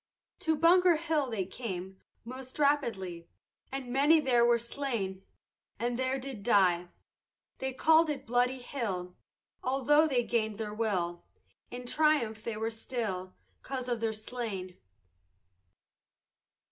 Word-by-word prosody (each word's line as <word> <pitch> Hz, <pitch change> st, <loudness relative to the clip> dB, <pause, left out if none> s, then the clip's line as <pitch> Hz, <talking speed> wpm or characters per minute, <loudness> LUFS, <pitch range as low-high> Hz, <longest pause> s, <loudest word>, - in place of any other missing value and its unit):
To 320 Hz, -4 st, +1 dB
Bunker 345 Hz, +3 st, +5 dB
Hill 310 Hz, -4 st, 0 dB
they 205 Hz, -5 st, -2 dB
came 190 Hz, -3 st, -6 dB, 0.2 s
Most 255 Hz, +1 st, -8 dB
rapidly, 225 Hz, -, 0 dB, 0.4 s
And 260 Hz, -2 st, -4 dB
many 295 Hz, +4 st, +5 dB
there 250 Hz, -5 st, +3 dB
were 240 Hz, 0 st, +5 dB
slain, 230 Hz, -6 st, -3 dB, 0.6 s
And 240 Hz, +2 st, -2 dB
there 260 Hz, +1 st, +1 dB
did 265 Hz, -5 st, -6 dB
die. 185 Hz, -5 st, +3 dB, 0.7 s
They 265 Hz, 0 st, -2 dB
call'd 320 Hz, +4 st, +4 dB
it 275 Hz, -2 st, -3 dB
bloody 245 Hz, +2 st, +2 dB
hill, 200 Hz, -9 st, -4 dB, 0.5 s
Altho' 275 Hz, +4 st, +4 dB
they 255 Hz, -5 st, +1 dB
gain'd 220 Hz, -3 st, -1 dB
their 215 Hz, -2 st, -4 dB
will 185 Hz, -6 st, -1 dB, 0.5 s
In 245 Hz, 0 st, -7 dB
triumph 245 Hz, -7 st, +2 dB
they 230 Hz, -2 st, -3 dB
were 225 Hz, +1 st, -2 dB
still, 215 Hz, -6 st, -4 dB, 0.3 s
'Cause 260 Hz, -2 st, -5 dB
of 240 Hz, -2 st, -1 dB
their 225 Hz, -1 st, 0 dB
slain. 215 Hz, -5 st, -5 dB
240 Hz, 125 wpm, -31 LUFS, 210-270 Hz, 0.7 s, Bunker